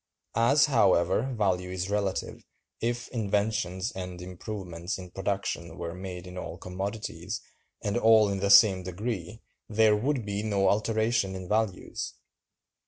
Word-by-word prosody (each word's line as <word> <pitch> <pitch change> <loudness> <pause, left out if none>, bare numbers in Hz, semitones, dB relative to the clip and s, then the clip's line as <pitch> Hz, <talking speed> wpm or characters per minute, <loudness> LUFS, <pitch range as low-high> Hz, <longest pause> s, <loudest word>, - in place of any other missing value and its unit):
As, 135 +6 +5
however, 105 - +3
value 90 -3 +1
is 95 +1 -3
relative, 100 -2 -2 0.4
if 120 +1 -2
inventions 100 -3 -1
and 90 -1 -6
improvements 90 0 -5
in 90 -2 -10
production 95 -4 -3
were 85 -1 -4
made 90 -1 -7
in 90 0 -7
all - - -6
commodities, 95 0 -4 0.4
and 100 - -1
all 110 -2 +6
in 100 -1 -1
the 100 +1 0
same 100 -2 +7
degree, 95 +2 -5 0.3
there 110 0 +4
would 125 +2 0
be 100 0 -2
no 100 -3 +2
alteration 110 -1 +1
in 95 -1 -6
values. 105 -3 -1
100 Hz, 135 wpm, -28 LUFS, 90-110 Hz, 0.4 s, same